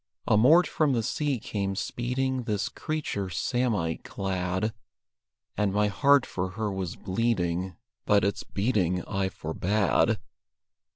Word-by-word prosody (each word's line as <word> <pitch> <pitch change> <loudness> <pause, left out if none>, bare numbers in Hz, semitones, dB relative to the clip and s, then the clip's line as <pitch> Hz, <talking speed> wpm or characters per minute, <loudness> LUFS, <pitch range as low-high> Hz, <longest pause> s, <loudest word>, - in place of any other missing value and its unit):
Amort 145 +12 +6
from 150 -4 +1
the 115 -2 +1
sea 140 +3 0
came 100 -3 -3
speeding 125 +4 -2
This 105 -3 -1
creature 150 - -3
samite 105 -4 -1
clad; 95 +2 -2 0.8
And 105 -1 +1
my 105 +1 +2
heart 140 +4 +4
for 95 0 -3
her 110 -2 -1
was 95 -3 -3
bleeding, 95 -4 -1 0.3
But 105 -1 +4
its 100 +1 0
beating 95 -5 0
I 95 -1 -1
forbade. 95 +4 +1
105 Hz, 120 wpm, -27 LUFS, 95-125 Hz, 0.8 s, Amort